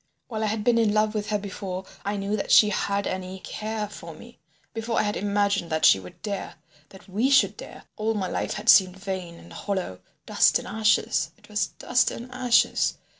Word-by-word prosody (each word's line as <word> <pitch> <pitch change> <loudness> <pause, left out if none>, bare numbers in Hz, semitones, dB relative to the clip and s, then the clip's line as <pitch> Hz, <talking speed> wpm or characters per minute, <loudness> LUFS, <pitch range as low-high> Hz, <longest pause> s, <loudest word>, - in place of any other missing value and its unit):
While 220 -2 -3
I - - +1
had 215 0 -2
been 235 0 +3
in 215 -2 +2
love 215 0 +2
with 210 -1 -3
her 210 - +1
before 190 -2 -6 0.2
I 205 +1 -2
knew 200 +1 -2
that 200 - -4
she 210 - +7
had 200 0 -1
any 185 0 -4
care 215 0 -4
for 165 -5 -10
me, 235 +8 -15 0.3
before 225 0 -3
I - - +3
had 205 0 -1
imagined 200 -3 0
that 160 0 +2
she 95 - +7
would 90 -1 -13
dare—that 190 -4 -8
we 215 +8 0
should 270 -1 +4
dare, - - -11
all 220 +1 -1
my 190 -3 -1
life - - -2
had 210 +2 -7
seemed 190 -4 +6
vain 190 -3 -5
and 170 - -14
hollow, 190 - -4 0.3
dust - - +4
and - - -8
ashes. 220 0 +1
It - - -21
was 210 0 0
dust 250 0 +1
and 245 +2 -8
ashes. 250 -2 +2
205 Hz, 205 wpm, -25 LUFS, 190-220 Hz, 0.3 s, she